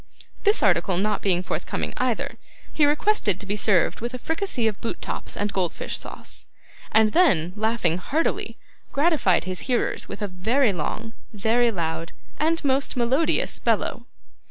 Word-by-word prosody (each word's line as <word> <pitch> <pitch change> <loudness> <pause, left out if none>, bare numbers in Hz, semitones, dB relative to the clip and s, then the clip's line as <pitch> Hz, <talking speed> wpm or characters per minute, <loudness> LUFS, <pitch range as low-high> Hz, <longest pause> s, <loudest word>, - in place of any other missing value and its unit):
This 415 - +3
article 180 -2 +3
not 210 +2 0
being 180 -2 +2
forthcoming - - -3
either, - - -1 0.4
he 295 -2 +4
requested 295 - +2
to - - -7
be 200 +1 -1
served 200 -4 +2
with 240 +2 -3
a - - -3
fricassee 320 - -2
of 215 -2 -1
boot 230 - -3
tops - - -5
and 205 0 -1
goldfish 180 -3 -2
sauce, - - -9 0.4
and 220 -1 +5
then 185 - +4
laughing 215 -6 +1
heartily, 305 - -1 0.3
gratified 290 - +3
his 185 0 -3
hearers 245 -2 0
with - - -5
a - - 0
very 215 +6 +2
long, 220 +7 -4 0.2
very 225 +3 +2
loud, 165 -4 -3 0.3
and 320 +1 +1
most 270 -1 +1
melodious 255 +7 +1
bellow. - - 0
220 Hz, 155 wpm, -24 LUFS, 185-275 Hz, 0.4 s, and